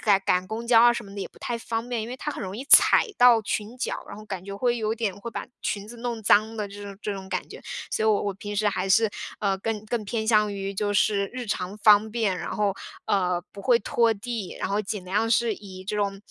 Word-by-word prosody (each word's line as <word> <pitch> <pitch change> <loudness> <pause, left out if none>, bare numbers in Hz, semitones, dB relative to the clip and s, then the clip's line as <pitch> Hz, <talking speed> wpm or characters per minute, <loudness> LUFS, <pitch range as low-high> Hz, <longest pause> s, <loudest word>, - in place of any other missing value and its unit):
赶 200 -3 +4
赶 180 0 +2
公 220 +3 -5
交 235 -1 +6
啊 240 +1 +7
什 235 -1 -5
么 195 - -12
的 200 - -6
也 - - -3
不 - - -19
太 235 - -3
方 230 +1 -4
便， 240 -2 -1
因 220 - -6
为 250 - -6
它 295 - -4
很 - - -6
容 190 +2 -5
易 260 - -6
踩 420 +8 +7
到 245 -2 +7
裙 215 +2 -3
脚， 255 - -3
然 200 - -8
后 215 - -10
感 190 -3 -6
觉 200 0 -6
会 240 +1 +1
有 220 -1 -1
点 225 -4 -1
会 235 - -6
把 - - -5 0.2
裙 205 0 -3
子 240 - -9
弄 235 -1 -4
脏 215 +2 +3
的 210 -2 -3
这 205 +1 -10
种 200 -1 -8
这 210 - -2
种 190 -1 -8
感 - - -3
觉。 - - -10 0.3
所 220 - 0
以 - - +4
我 210 -2 +3
我 205 - -1
平 205 +2 -7
时 210 0 +2
还 195 -1 -2
是， 220 +3 +4 0.3
呃， 195 -2 0
更 215 +1 -3
更 225 0 -2
偏 220 +1 -2
向 210 -2 +3
于 195 0 -4
就 205 +1 -1
是 205 -1 +2
日 250 -1 -5
常 195 -1 -3
方 210 0 +5
便， 215 -6 0
然 - - -5
后， 205 -1 +1 0.3
呃， 180 -3 +1
不 200 - -9
会 240 +4 +4
拖 230 +2 +2
地， 220 -2 -5
然 - - -1
后 205 +1 0
尽 205 -2 -5
量 205 +5 0
是 235 0 +3
以 190 -3 -10
这 210 +2 -3
种， 200 -1 -1
210 Hz, 285 characters per minute, -25 LUFS, 200-230 Hz, 0.3 s, 啊